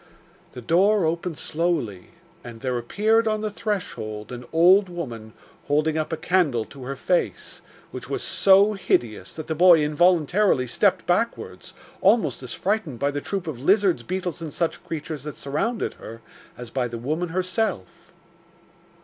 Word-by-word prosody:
The 125 - -9
door 190 - +3
opened 165 0 -2
slowly, 150 - -2 0.4
and 115 -2 -10
there 130 -1 -1
appeared 220 - +1
on 215 -1 0
the 215 -1 -2
threshold 110 - -4
an 125 0 -7
old 180 +4 +5
woman 120 -11 -7 0.3
holding 155 +2 +1
up 155 0 -2
a 160 - -2
candle 155 -13 +1
to 135 -2 -11
her 135 +2 -4
face, 180 +5 -2 0.3
which - - -8
was - - -2
so 200 +2 +4
hideous 115 - -1
that 155 - -6
the 160 - -2
boy 170 -1 +6
involuntarily 170 0 +3
stepped 125 - +1
backwards, - - -2 0.3
almost 185 - +3
as 125 -2 -6
frightened 195 - -2
by 140 +4 0
the 145 0 -4
troop 195 +2 -3
of 145 -7 -6
lizards, 195 +3 +3
beetles 180 -2 -4
and 155 -3 -5
such 170 - -2
creatures 155 -2 -5
that 150 +1 -8
surrounded 180 - -2
her, 115 +1 -11 0.4
as 120 -1 -9
by 125 -1 -1
the 120 -1 -6
woman 155 +9 -2
herself. 185 - -3
160 Hz, 160 wpm, -24 LUFS, 130-185 Hz, 0.4 s, boy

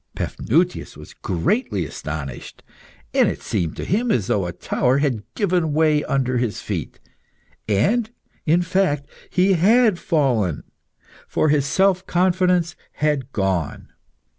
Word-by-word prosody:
Paphnutius 170 +8 -1
was - - -12
greatly 95 - -1
astonished, 70 -3 -7 0.5
and - - +4
it - - -6
seemed 80 -3 -2
to - - -5
him 230 +6 0
as 115 - +1
though 95 -2 0
a - - -3
tower 125 +8 0
had 140 -7 0
given 175 -6 +1
way 155 -1 +3
under 130 -2 0
his 120 -4 -2
feet. - - -5 0.7
And, 210 - +2 0.3
in 170 +3 +3
fact, 175 -6 0 0.2
he 190 +1 +3
had 210 +2 +4
fallen, 120 - 0 0.6
for 155 - +1
his 145 -1 +2
self 190 +3 +2
confidence 180 -1 +2 0.2
had 145 -3 -1
gone. 95 - -2
150 Hz, 130 wpm, -21 LUFS, 110-180 Hz, 0.7 s, and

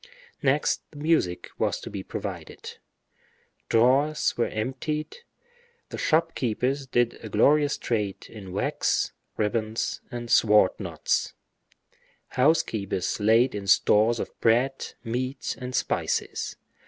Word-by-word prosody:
Next - - +2
the 145 - -14
music 145 - 0
was - - 0
to - - -8
be - - -4
provided; - - -7 0.9
drawers 135 +6 +3
were 120 - +1
emptied; 135 - -3 0.7
the - - -6
shop 165 +1 +2
keepers 130 +3 -1
did 120 -2 +1
a 110 - -6
glorious 145 +7 +3
trade 105 -5 -2
in 100 -4 -10
wax, 95 - 0 0.3
ribbons, 110 +1 -1
and 120 -1 -6
sword 105 -3 +5
knots; - - -1 0.9
housekeepers 125 - +1
laid 115 +5 +4
in 100 -1 -5
stores 110 +4 +4
of - - -4
bread, 125 +4 +1
meat, 130 +3 -3
and 125 0 -5
spices. 125 - -1
120 Hz, 115 wpm, -26 LUFS, 110-135 Hz, 0.9 s, sword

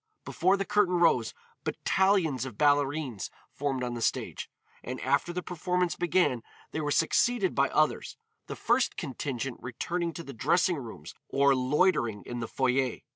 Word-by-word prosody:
Before 190 +3 +2
the 195 - -2
curtain 210 -3 +2
rose, 165 -9 +3 0.3
battalions 185 - +1
of 130 -6 -7
ballerines 145 -5 +1 0.2
formed 135 -3 -2
on 120 -1 -2
the 120 - -5
stage, - - -2 0.3
and 130 +1 -5
after 140 +6 +1
the 180 0 -4
performance 180 -1 -1
began 170 -7 +1 0.3
they 160 - -3
were 145 - -2
succeeded 190 +7 +2
by 140 0 +2
others, 155 0 0 0.3
the - - -5
first 240 +2 +1
contingent 135 -4 -4
returning 170 +8 -3
to 170 - -7
the 140 - -9
dressing 175 +8 +2
rooms 110 - -9 0.2
or 140 0 +4
loitering 130 - +1
in 120 - -5
the 115 - -3
foyer. 130 0 0
145 Hz, 155 wpm, -29 LUFS, 125-175 Hz, 0.3 s, or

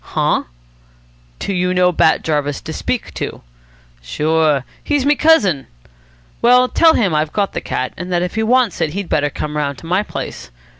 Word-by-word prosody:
"Huh?" - - 0 0.9
"Do 200 - -3
you 180 0 0
know 180 0 +4
Bat 160 -2 +2
Jarvis 145 -2 -1
to - - -7
speak - - -3
to?" - - -5 0.6
"Sure. 150 - +1 0.2
He's 290 -3 0
me 290 - +5
cousin." 210 - +3 0.7
"Well, 250 +1 +5
tell 320 +4 +4
him 195 -8 +1
I've 155 0 0
got 200 -2 -1
the - - -3
cat, 130 - -3
and 180 +2 -6
that 175 0 +1
if 180 - -3
he 220 - -1
wants 240 -2 +2
it 150 - 0
he'd 200 -1 -4
better 145 -1 +1
come 150 +1 -5
round 140 -2 -2
to - - -12
my 180 +4 +1
place. 210 - -7
180 Hz, 185 wpm, -17 LUFS, 150-220 Hz, 0.9 s, me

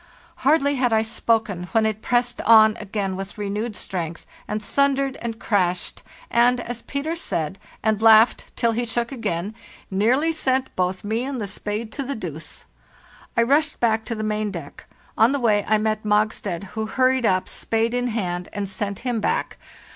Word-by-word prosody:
Hardly 285 -3 +3
had 250 -2 +2
I 220 0 +3
spoken, 220 -5 0
when 225 -1 +3
it 215 0 -1
pressed 245 +1 0
on 220 -1 +7
again 200 -2 -3
with 195 +2 -7
renewed 210 +2 -3
strength, 170 -5 -4 0.2
and 210 - -2
thundered 275 +4 +1
and 230 -1 -4
crashed, 180 -6 0 0.3
and, 245 +1 +4
as 240 -1 -5
Peter 290 +4 -3
said, 170 - -3 0.2
and 220 -1 +1
laughed 225 +1 +5
till 235 -1 +2
he 235 +2 -1
shook 235 +1 -2
again, 205 -6 -3 0.4
'nearly 245 +11 +2
sent 265 -4 0
both 185 0 -1
me 220 +3 -1
and 270 -1 -3
the 210 - -2
spade 210 +3 -4
to - - -4
the 275 +1 -3
deuce.' 165 -6 -6 0.7
I 235 - +5
rushed 295 +5 +2
back 220 -2 +2
to 230 - -3
the 215 - -4
main 215 0 -1
deck; 170 -7 -9 0.3
on 230 +5 +5
the 280 - 0
way 210 -4 +3
I 215 - +4
met 215 0 0
Mogstad, 210 -3 0
who 220 0 -2
hurried 255 0 +2
up, 185 0 +1
spade 225 +1 -1
in 245 0 0
hand, 180 -6 -3
and 205 -1 -3
sent 200 +2 -4
him 245 -3 0
back. - - -1
220 Hz, 175 wpm, -23 LUFS, 205-245 Hz, 0.7 s, on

